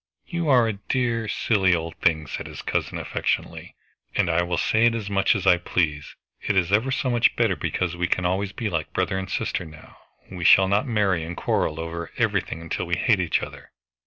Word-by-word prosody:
"You 170 -3 -2
are 125 -4 +5
a 110 - -1 0.2
dear, 120 -3 0
silly 95 -4 +2
old 80 0 -4
thing," 80 -2 +1
said - - -6
his - - -9
cousin - - -2
affectionately, - - -3 0.4
"and 90 -4 +2
I 80 +2 +2
will 90 0 -1
say 110 +2 +2
it 120 -1 +3
as 105 -3 -4
much 100 +2 +3
as 100 -2 -3
I 90 -2 +6
please. 80 -4 -2 0.3
It 105 - 0
is 90 -1 +2
ever 110 +6 +2
so 135 -1 0
much 120 0 +3
better, 115 -5 +2
because 85 +1 -2
we 90 0 -1
can 90 0 0
always 95 +2 0
be 115 +1 -4
like 80 -6 -3
brother 95 - 0
and 95 -1 -6
sister - - -2
now, 80 -1 -14 0.3
and 95 - -9
we - - -4
shall 95 +3 +7
not 100 +7 +1
marry 100 -7 +1
and 85 +2 -6
quarrel 75 - 0
over 85 0 -5
everything 80 0 -1
till 85 - -3
we 90 - +1
hate 100 +3 +2
each 90 -3 0
other." - - -10
95 Hz, 220 wpm, -24 LUFS, 85-110 Hz, 0.4 s, shall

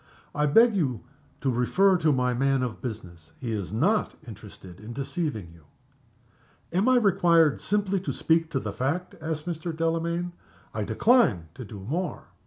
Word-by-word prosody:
"I 150 0 +1
beg 225 +10 +6
to 140 - -1 0.5
refer 125 +12 +3
you 185 - +3
to 155 -2 +3
my 125 -2 +1
man 135 +1 +1
of 120 -3 -4
business. 90 -9 -8
He 120 -4 -4
is 100 -6 -3
not 180 - +1
interested 95 -4 -11
in 110 +3 -8
deceiving 135 - -3
you." 85 -3 -19 1.1
"Am 195 +8 +3
I 255 - +5
required 170 - +3
simply 200 -1 0
to 180 - -4
speak 165 0 +1
to 135 - -1
the 105 -5 -5
fact?" 150 - -2
asked 155 -1 -4
Mr. 170 0 -4
Delamayn. 165 +1 -1 0.4
"I 105 -1 -2
decline 110 - +3
to 125 - -8
do 100 -2 -9
more." 160 - -4
145 Hz, 165 wpm, -26 LUFS, 110-175 Hz, 1.1 s, beg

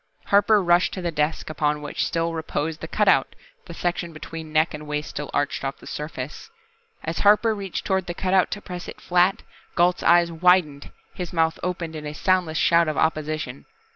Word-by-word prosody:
Harper 205 0 +4
rushed 175 +1 +3
to 185 - -4
the 170 - -1
desk 150 0 -1
upon 150 -1 0
which 145 0 -3
still 165 0 -1
reposed 160 0 -3
the 160 - -5
cutout, 195 -8 +2 0.3
the 170 - -9
section 175 -1 -2
between 155 0 -8
neck 155 +2 +2
and 150 0 -8
waist 150 0 -3
still 145 0 -5
arched 145 -1 -1
off 135 0 -3
the - - -16
surface. 150 - -6 0.5
As 165 - -3
Harper 210 +2 +5
reached 195 -3 -5
toward 190 -2 0
the 175 - -4
cutout 185 0 +2
to 205 - -5
press 180 -1 -7
it - - -9
flat, 180 +2 +2 0.3
Gault's 175 +1 +3
eyes 170 0 +4
widened, 165 -4 +2 0.2
his 180 -2 -5
mouth 165 -1 +1
opened 170 -2 -3
in 150 -1 -6
a 150 - -5
soundless 180 -2 +1
shout 170 0 +4
of 155 - -2
opposition. 155 -4 -1
165 Hz, 190 wpm, -24 LUFS, 155-180 Hz, 0.5 s, Harper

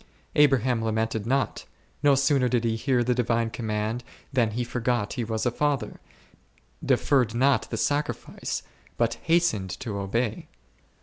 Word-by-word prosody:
Abraham 130 -5 +4
lamented 110 -1 -1
not; 135 +2 0 0.4
no 145 -1 +5
sooner 135 -2 +3
did 120 -2 +1
he 115 -1 +1
hear 125 +1 +1
the 125 +1 +2
divine 115 -1 0
command 110 +1 -2 0.3
than 120 -4 +3
he 120 +3 -2
forgot 120 -2 -1
he 125 - -2
was 110 0 -2
a 120 - +2
father, 145 +2 -1 0.8
de - - +3
ferred 125 -5 +2
not 135 +2 +2
the 115 - -3
sacrifice, 145 +5 -2 0.3
but 115 -1 0
hastened 165 - +2
to 105 -6 -4
obey. 110 +3 -2
120 Hz, 145 wpm, -26 LUFS, 110-135 Hz, 0.8 s, no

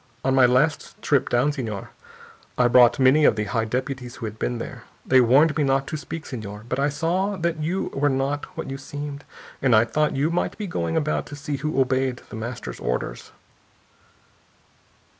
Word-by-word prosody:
On 135 - +2
my 130 -2 +6
last 130 +6 +1
trip, 140 -3 +2
down, 125 +5 +2
senor, 115 -9 -5 0.7
I 125 - +4
brought 120 0 +6
many 135 +3 +5
of 115 - +5
the 105 - -1
high 115 +2 -1
deputies 125 +1 -4
who 115 - -6
had 110 0 -7
been 120 - -1
there. 115 +1 -7 0.2
They 130 -1 +5
warned 140 +6 +4
me 155 - +1
not 135 0 +1
to - - -3
speak, 160 +1 -6
senor, 105 -4 -7
but 130 +2 -2
I 140 +1 +2
saw 180 +7 -1
that 170 -2 -1
you 175 +5 -2
were 145 +1 +2
not 135 +2 -1
what - - -4
you 135 0 -5
seemed, 145 0 -7 0.4
and 125 -4 +4
I 110 +2 +5
thought 150 +6 0
you 145 +4 +1
might 175 - -1
be 210 - -4
going 85 - -2
about 155 0 -1
to 145 - -8
see 145 0 -4
who 150 0 -2
obeyed 130 -1 0
The - - -6
Master's 115 +2 -6
orders...." - - -3
135 Hz, 195 wpm, -24 LUFS, 120-150 Hz, 0.7 s, my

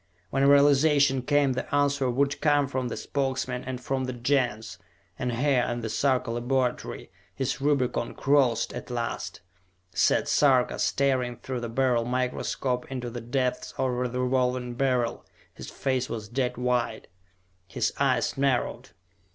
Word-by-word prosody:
When 135 +1 +3
realization 140 -1 +5
came, 145 0 +2
the 130 - -3
answer 140 -2 +2
would 140 +3 0
come 145 -2 +3
from 130 -1 -2
the 120 - -5
Spokesmen 130 -2 -2
and 130 -1 -5
from 130 +1 -2
the 130 - -4
Gens; 120 -3 -1 0.4
and 125 -1 -1
here 130 +1 +2
in 120 0 -3
the 110 - -4
Sarka 130 -1 +1
laboratory, 125 +1 -2 0.2
his 135 +2 -2
Rubicon 135 -4 0
crossed 135 -5 +2
at - - -7
last, 120 -1 -4 0.5
sat 95 - +2
Sarka, 130 -4 +3
staring 130 -3 +1
through 130 -2 -5
the 120 -1 -5
Beryl 125 -1 +1
microscope 125 0 -2
into 125 -2 -4
the 120 0 -6
depths 125 +2 -2
of 130 - 0 0.2
the 125 - -3
Revolving 125 -1 0
Beryl. 125 -2 0 0.3
His - - -9
face 130 -2 -1
was 110 -2 -5
dead 125 0 -1
white, 125 -2 -1 0.6
his - - -1
eyes - - +1
narrowed. 135 -3 0
130 Hz, 145 wpm, -27 LUFS, 125-135 Hz, 0.6 s, realization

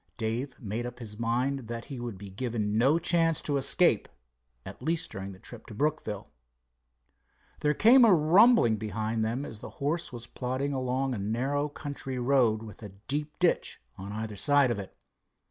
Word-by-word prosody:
Dave 120 +4 -3
made 115 +2 -3
up 120 - -9
his 110 -3 -9
mind 125 +2 -1
that 115 0 -5
he 135 -3 -7
would 120 -5 -5
be 100 0 -10
given 110 -1 -2
no 135 +8 +4
chance 165 -2 +2
to 145 - -2
escape, 135 - +3 0.6
at - - -9
least 160 +4 -1
during 95 0 -6
the 95 - -12
trip 115 +4 -11
to 110 - -9
Brookville. 140 -7 -2 1.3
There 150 0 +1
came 245 - +7
a 225 - +7
rumbling 180 - +5
behind 110 +1 -2
them 120 +6 -2
as 110 - -8
the - - -8
horse 155 +5 -2
was 120 -2 -7
plodding 130 +4 -3
along 130 0 -1
a 115 - -4
narrow 130 +8 -1
country 140 -3 -6
road 120 -4 +2
with 110 -1 -11
a 105 - -7 0.2
deep 150 +2 -3
ditch 175 -2 +1 0.2
on 100 +1 -8
either 110 0 -5
side 140 +3 +3
of 115 - -2
it. 95 - -9
125 Hz, 180 wpm, -29 LUFS, 110-145 Hz, 1.3 s, came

